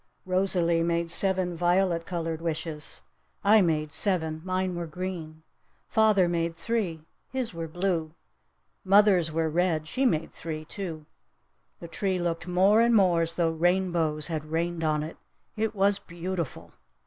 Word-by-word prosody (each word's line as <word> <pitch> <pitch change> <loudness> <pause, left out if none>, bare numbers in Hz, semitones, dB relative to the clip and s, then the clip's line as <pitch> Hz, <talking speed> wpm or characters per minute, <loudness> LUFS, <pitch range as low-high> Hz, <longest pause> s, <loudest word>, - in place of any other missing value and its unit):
Rosalee 185 -3 +1
made 170 0 0
seven 185 -1 +1
violet 175 0 +1
colored 165 -2 -3
wishes! 160 -2 -3 0.4
I 210 +1 +6
made 155 -4 0
seven! 160 -2 +1
Mine 185 0 -1
were 175 -1 -4
green! 160 -2 -6 0.5
Father 215 -4 +4
made 170 -1 -1
three! 170 -5 -2 0.2
His 260 -5 -2
were 165 -1 -5
blue! 170 -2 -2 0.7
Mother's 195 -4 +4
were 160 +1 0
red! 160 -1 0
She 260 +9 +1
made 160 -8 -1
three, 155 -1 -6
too! 165 -4 -6 0.7
The 170 - -8
tree 190 +2 -1
looked 170 -1 -2
more 190 +5 +4
and 235 0 +4
more 180 -5 +4
as 165 0 +1
tho 165 -2 +1
rainbows 170 -2 +1
had 155 -3 -2
rained 165 +1 -2
on 155 -1 +1
it! 155 - -8 0.4
It 220 0 -2
was 200 0 +2
beautiful! 170 -2 -5
170 Hz, 145 wpm, -27 LUFS, 160-190 Hz, 0.7 s, I